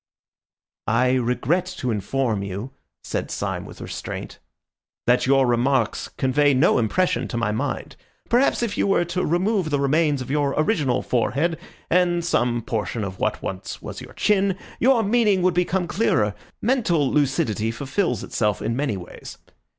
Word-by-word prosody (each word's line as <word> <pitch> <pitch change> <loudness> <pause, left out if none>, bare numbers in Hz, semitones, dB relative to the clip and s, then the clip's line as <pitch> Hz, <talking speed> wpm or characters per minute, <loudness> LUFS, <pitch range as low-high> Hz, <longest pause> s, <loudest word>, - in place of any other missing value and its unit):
"I 125 0 +3
regret 130 +8 +1
to 125 - -1
inform 110 +1 -1
you," 100 +6 -5 0.3
said - - -3
Syme - - -3
with - - -11
restraint, - - -6 0.7
"that 125 +1 +3
your 135 0 +4
remarks 120 0 +1
convey 140 +1 +2
no 130 0 +4
impression 175 - +1
to 120 - -4
my 115 -2 0
mind. 110 - -3 0.3
Perhaps 240 0 +2
if 225 -3 -2
you - - +2
were 195 -3 +2
to 175 +2 -2
remove 185 +1 +1
the 145 -2 +1
remains 145 +1 +2
of 130 0 -5
your 145 -1 +1
original 155 - +1
forehead 145 +7 0 0.3
and 175 -1 +2
some 120 -7 +1
portion 110 0 -2
of 95 -1 -6
what - - -1
was 95 0 -5
once - - -7
your - - -11
chin, 195 -2 +2 0.2
your 245 -2 +4
meaning 210 -3 +3
would 185 -1 +3
become 180 +1 +1
clearer. 110 - +1 0.3
Mental 210 - +2
lucidity 125 -6 +1
fulfils 140 - -1
itself 105 -3 0
in 115 - -2
many 135 -6 -1
ways. 90 - -10
140 Hz, 155 wpm, -23 LUFS, 120-180 Hz, 0.7 s, your